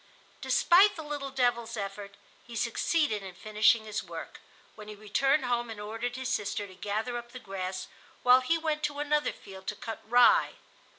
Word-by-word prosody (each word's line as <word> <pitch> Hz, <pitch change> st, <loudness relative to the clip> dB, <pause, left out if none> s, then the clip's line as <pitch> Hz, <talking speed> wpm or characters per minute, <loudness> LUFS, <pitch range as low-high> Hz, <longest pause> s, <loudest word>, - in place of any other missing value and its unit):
Despite 390 Hz, +4 st, +5 dB
the 320 Hz, -, -7 dB
little 290 Hz, -2 st, -4 dB
devil's 240 Hz, -3 st, 0 dB
efforts 200 Hz, 0 st, -6 dB, 0.3 s
he 235 Hz, -, -9 dB
succeeded 235 Hz, +1 st, 0 dB
in 190 Hz, -2 st, -9 dB
finishing 215 Hz, +2 st, +3 dB
his 215 Hz, 0 st, -3 dB
work, -, -, -8 dB, 0.3 s
when 215 Hz, -1 st, -12 dB
he 210 Hz, -, -8 dB
returned 270 Hz, +7 st, +1 dB
home 240 Hz, -1 st, -1 dB
and 220 Hz, -2 st, -7 dB
ordered 225 Hz, +4 st, -4 dB
his 260 Hz, 0 st, -4 dB
sister 205 Hz, -3 st, -2 dB
to 190 Hz, -, -13 dB
gather 215 Hz, +6 st, -3 dB
up 240 Hz, 0 st, -13 dB
the -, -, -7 dB
grass 190 Hz, -4 st, -5 dB, 0.4 s
while 250 Hz, +1 st, +7 dB
he 330 Hz, +6 st, +1 dB
went 310 Hz, -2 st, -2 dB
to 290 Hz, -1 st, -4 dB
another 295 Hz, 0 st, +1 dB
field 190 Hz, -1 st, -13 dB
to 210 Hz, -, -2 dB
cut 225 Hz, 0 st, -7 dB
rye. 245 Hz, -, +5 dB
235 Hz, 180 wpm, -29 LUFS, 210-270 Hz, 0.4 s, while